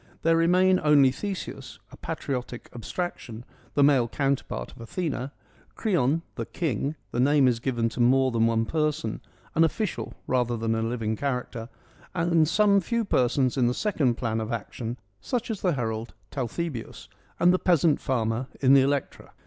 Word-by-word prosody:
There 165 0 +4
remain 185 +3 +4
only 145 -3 +6
Theseus, 195 +7 -6
a - - -11
patriotic 125 -2 -5
abstraction, 120 -3 -5 0.3
the 145 - +4
male 135 -4 +4
counterpart 135 - -2
of - - -14
Athena; 140 0 -3 0.4
Creon, 165 - +1
' - - -40
the - - -3
King 145 - -2
' - - -40
— 100 - -41
the 120 - -2
name 140 +1 +4
is 120 -2 +2
given 120 -2 0
to 115 - -9
more 130 +2 +4
than 115 -1 +2
one 115 0 +1
person 155 +2 -1 0.2
— - - -30
an 165 - +4
official 185 +5 -2
rather 120 -2 0
than 115 0 0
a 115 - 0
living 115 -1 -1
character; 125 -2 -3 0.5
and 165 -2 +3
some 200 +3 +4
few 230 +5 -1
persons 130 -4 +1
in 125 -2 +3
the 125 - 0
second 150 - +1
plan 115 -2 -2
of 110 +1 -4
action: 115 +1 -4 0.2
such 240 - -2
as 210 - -5
the 180 -3 +2
herald 115 -3 -3 0.2
Talthybius 135 0 -4 0.3
and 175 +1 +5
the 185 - +2
peasant 165 -4 +3
farmer 115 -1 -1
in 135 -1 +5
the 135 - +7
Electra. 140 0 -2
135 Hz, 175 wpm, -26 LUFS, 120-165 Hz, 0.5 s, the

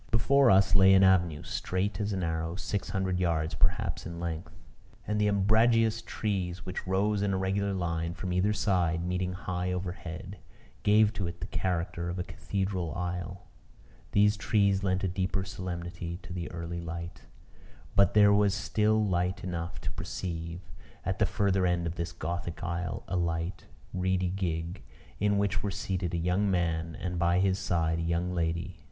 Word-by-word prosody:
Before 135 +4 +4
us 95 -1 +5
lay 95 0 +7
an 95 - +6
avenue, 90 -5 +3
straight 95 +2 -2
as 105 +1 -1
an 95 -2 -1
arrow, 80 0 -2
six 100 0 -3
hundred 95 -2 0
yards, 80 -3 0
perhaps, - - 0
in 85 0 -7
length; 85 -1 -4 0.5
and 105 +1 0
the 105 - +3
umbrageous 110 +3 +3
trees, 95 -5 -3
which 90 0 -5
rose 100 +2 +1
in 100 -1 +1
a - - +1
regular 100 +1 0
line 85 -2 -2
from 90 -1 -3
either 95 +4 +2
side, 85 -5 +1
meeting 90 0 -1
high 90 0 -3
overhead, 90 0 -5 0.4
gave 105 +1 +5
to 95 -5 -2
it 85 0 -7
the - - -4
character 85 -1 -2
of 90 - -3
a 90 - -1
cathedral 95 -2 -3
aisle. 90 +1 -4 0.7
These 105 +1 +4
trees 100 -2 +2
lent 95 0 +1
a - - +2
deeper 95 +1 -1
solemnity 85 -2 -5
to 90 - -8
the 85 -2 -4
early 85 0 -5
light; 85 -4 -6 0.7
but 100 +1 +4
there 105 -1 +7
was 100 -1 +3
still 105 +1 +2
light 90 0 0
enough 85 -2 -4
to - - -4
perceive, 85 -1 -5 0.4
at - - -1
the - - +4
further 95 -2 +1
end 85 -1 +1
of 85 - -2
this 85 -1 -4
gothic 85 +1 -4
aisle, 85 0 -3
a - - -2
light, 85 +1 -2 0.3
reedy 95 0 +1
gig, 85 -1 -3 0.4
in 105 0 +2
which 100 -1 +1
were 105 - -2
seated 95 -3 -2
a - - +1
young 90 +4 +1
man, 85 -3 0
and, 90 -1 -3
by 85 +1 +3
his 95 0 +2
side, 85 -3 0
a - - -1
young 85 +2 0
lady. 85 +1 -2
90 Hz, 175 wpm, -29 LUFS, 85-100 Hz, 0.7 s, lay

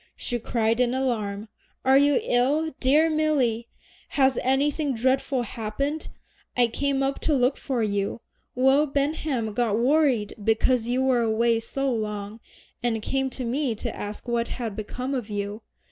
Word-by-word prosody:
she 240 - -3
cried 225 0 0
in 250 0 +2
alarm. 220 -5 -2 0.4
"Are 265 0 +5
you 285 0 +5
ill, 290 +6 +1
dear 295 +5 +4
Milly? 285 -8 +1 0.5
has 265 -2 +4
anything 280 +2 +1
dreadful 260 +2 +1
happened? 250 +8 -3 0.5
I 245 - +6
came 275 +3 0
up 270 0 -1
to 305 - +1
look 255 +1 +2
for 255 -5 -2
you. 205 +1 -1 0.3
Will 265 +4 +4
Benham 280 -5 -1
got 220 -2 +1
worried 255 -4 +2
because 225 +2 +2
you 250 +2 +1
were 255 -2 +3
away 230 +1 +2
so 275 +4 -2
long, 210 -1 -4 0.4
and 235 -2 0
came 270 +2 0
to 255 -1 -5
me 250 0 -1
to - - -5
ask 205 +4 -6
what 235 -1 0
had 230 -5 -4
become 250 +5 -4
of 245 -5 -3
you. 205 +1 -4
250 Hz, 155 wpm, -25 LUFS, 225-275 Hz, 0.5 s, I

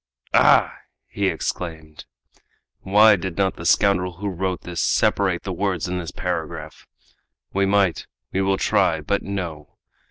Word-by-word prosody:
"Ah!" - - +5 0.3
he - - -2
exclaimed, 80 -3 -5 0.7
"why 105 +2 +5
did 95 -2 -5
not 95 -1 +1
the 85 - -4
scoundrel 90 -3 +2
who 100 +4 -4
wrote 95 0 -3
this 85 -2 -4
separate - - +1
the - - -4
words - - -2
in 90 0 -3
this 85 -2 -5
paragraph? 85 -4 -5 0.7
We 100 0 +1
might 95 -5 +1 0.2
we 95 - 0
will 95 0 +1
try 80 -3 +1
but 100 +7 -1
no! 85 -7 -6
90 Hz, 145 wpm, -22 LUFS, 85-100 Hz, 0.7 s, Ah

